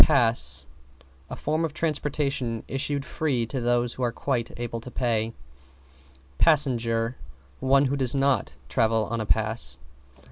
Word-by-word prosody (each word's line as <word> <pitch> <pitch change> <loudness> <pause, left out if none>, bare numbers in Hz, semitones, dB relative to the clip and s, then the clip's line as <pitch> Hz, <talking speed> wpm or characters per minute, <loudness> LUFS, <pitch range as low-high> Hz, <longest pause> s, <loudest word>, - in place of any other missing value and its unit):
=PASS= 120 -6 +4 0.6
A - - -5
form 155 +2 -1
of 155 -2 -3
transportation 140 -6 -1
issued 140 +1 -2
free 135 -7 -1
to 130 +3 -4
those 120 0 +1
who - - -8
are 120 - +1
quite 120 -2 -2
able 115 -1 -4
to 125 - -8
pay. 115 -3 0 1.1
=PASSENGER= 120 -6 +2 0.4
One 135 +1 +4
who 135 +1 0
does 130 -2 +2
not 135 -5 +1
travel 110 - +2
on 115 -1 -1
a 110 - -4
pass. 110 - 0
125 Hz, 140 wpm, -26 LUFS, 115-140 Hz, 1.1 s, =PASS=